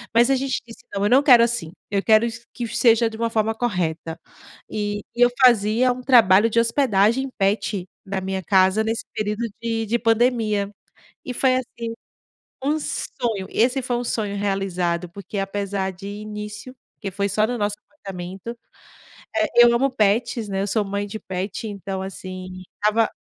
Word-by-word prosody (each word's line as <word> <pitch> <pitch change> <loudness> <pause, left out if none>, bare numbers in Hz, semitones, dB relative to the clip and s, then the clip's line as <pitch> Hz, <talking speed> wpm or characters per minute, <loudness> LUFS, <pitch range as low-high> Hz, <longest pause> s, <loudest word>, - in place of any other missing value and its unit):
mas 240 +3 +5
a 270 - +4
gente 265 0 -1
disse: 230 - -14
“Não, 200 0 -1
eu - - +2
não 260 +3 +6
quero 245 -5 +7
assim, 235 -9 -1 0.2
eu 200 -1 +1
quero 220 +1 +4
iss 235 0 -6
que 240 - -4
seja 230 0 +3
de 220 - -9
uma 230 0 0
forma 220 0 +1
correta”. 170 -8 -2 0.5
E 205 -1 -2
e 240 - -2
eu 245 - +7
fazia 235 +1 +5
um 250 +1 -5
trabalho 230 -4 +5
de 230 - +2
hospedagem 230 +1 +2
pet 200 -1 0 0.2
na 195 0 -2
minha 190 0 -3
casa 190 +3 +3
nesse 225 +1 -2
período 210 +2 -2 0.2
de 225 -1 -1
de 235 +3 0
pandemia. 225 -3 +2 0.6
E 250 - -5
foi 255 0 +3
assim, 240 -2 -5 0.8
um 300 +3 +1
sonho. 225 -9 -3
Esse 255 +4 +2
foi 245 -1 -2
um 245 - -2
sonho 210 -4 -2
realizado, 185 -3 -1
porque, 200 +2 -8
apesar 195 -1 -2
de 190 +2 -10
início, 210 +3 -7 0.2
porque 200 - -5
foi 200 +1 -1
só 215 +3 +2
no 245 0 -2
nosso 205 -1 -1
apartamento 195 -3 -8 0.8
eh, - - +3
eu 240 0 +7
amo 270 +3 +2
pets, 220 +1 +1
né, 195 0 -1
eu 200 - -1
sou 215 +1 +1
mãe 200 +1 -2
de 215 +2 -6
pet, 190 +4 -4
então 195 -2 -5
assim, 185 -1 -7
estava 215 +2 +2
215 Hz, 175 wpm, -22 LUFS, 195-235 Hz, 0.8 s, quero